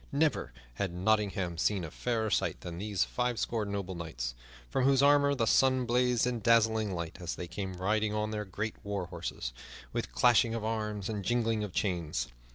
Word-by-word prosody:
Never 150 - +1 0.3
had 95 -3 -1
Nottingham 95 -3 +1
seen 95 +2 +1
a 80 - -6
fairer 110 -3 -1
sight - - 0
than 85 -1 -6
those 100 -1 0
fivescore 120 -2 -1
noble 100 -2 -3
knights, 70 -9 -4 0.3
from 130 - +1
whose 135 0 +4
armor 140 0 +5
the 115 -4 +1
sun 130 +2 +4
blazed 125 0 +2
in 125 -1 -1
dazzling 110 -3 +3
light 85 -2 -5
as 85 - -3
they 90 - -5
came 95 +2 -5
riding 105 +3 +1
on 105 0 -1
their 105 -1 -2
great 105 +3 -4
war 100 -3 -2
horses, 85 -8 -5 0.4
with - - -2
clashing 120 -1 +4
of 115 - -3
arms 105 -3 -2
and 105 -3 -3
jingling 115 0 +1
of 105 - -4
chains. 85 - -1
105 Hz, 180 wpm, -31 LUFS, 90-115 Hz, 0.4 s, armor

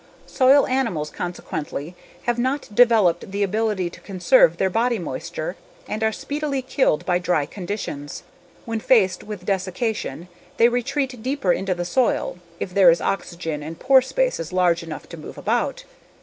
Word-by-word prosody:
Soil 270 +1 +5
animals 225 - -1
consequently 165 -2 -5 0.3
have 240 0 0
not 260 -2 -1
developed 210 -7 +4
the 200 +1 -1
ability 210 -2 0
to - - -13
conserve - - +4
their 190 - +2
body 235 +3 +1
moisture 170 +1 -5 0.3
and 215 +1 -3
are 220 - +3
speedily 285 +2 -3
killed 260 - +1
by 180 -1 +2
dry 180 -5 +1
conditions. 175 -5 -6 0.4
When 225 -1 -2
faced 215 -5 +3
with 205 -4 -8
desiccation 185 - -2 0.3
they 235 - +6
retreat 255 0 -2
deeper 255 -7 +1
into 190 -1 -1
the 175 0 -3
soil 235 -3 0 0.2
if 180 - -4
there 190 -2 +7
is 170 - +4
oxygen 170 -5 -3
and 160 +2 -7
pore 265 0 +5
spaces 265 - -1
large 180 -2 +2
enough 165 -2 -8
to 170 - -8
move 155 - -10
about. - - -1
195 Hz, 155 wpm, -22 LUFS, 175-245 Hz, 0.4 s, there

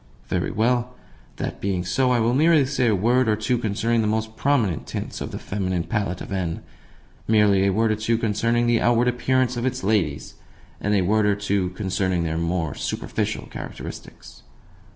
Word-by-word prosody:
Very - - 0
well. 120 +2 0 0.4
That - - -5
being 95 -2 -1
so, 125 +8 +1
I 125 -1 +3
will 115 +1 +2
merely 155 +1 +4
say 130 -2 0
a 110 - +3
word 120 +6 +2
or 105 - +3
two 120 +3 0
concerning 115 +1 0
the 110 - 0
most 110 +1 -1
prominent 120 - 0
tints - - -5
on - - -4
the - - -6
feminine 95 -3 -2
palette 100 -4 -2
of - - -8
N. 90 -4 -2 0.6
merely 105 -3 +4
a - - +3
word 110 +3 +2
or - - +2
two 110 +2 0
concerning 115 +2 +1
the 120 -1 +2
outward 120 +1 +3
appearance 125 0 +1
of 120 - -2
its 130 -3 -3
ladies, 95 -9 0 0.5
and 105 +1 0
a 100 - +3
word 105 +3 +2
or 100 - +3
two 100 -2 -1
concerning 95 -2 -1
their 80 0 -2
more 85 -2 -1
superficial - - -3
characteristics. - - -9
110 Hz, 185 wpm, -23 LUFS, 95-120 Hz, 0.6 s, merely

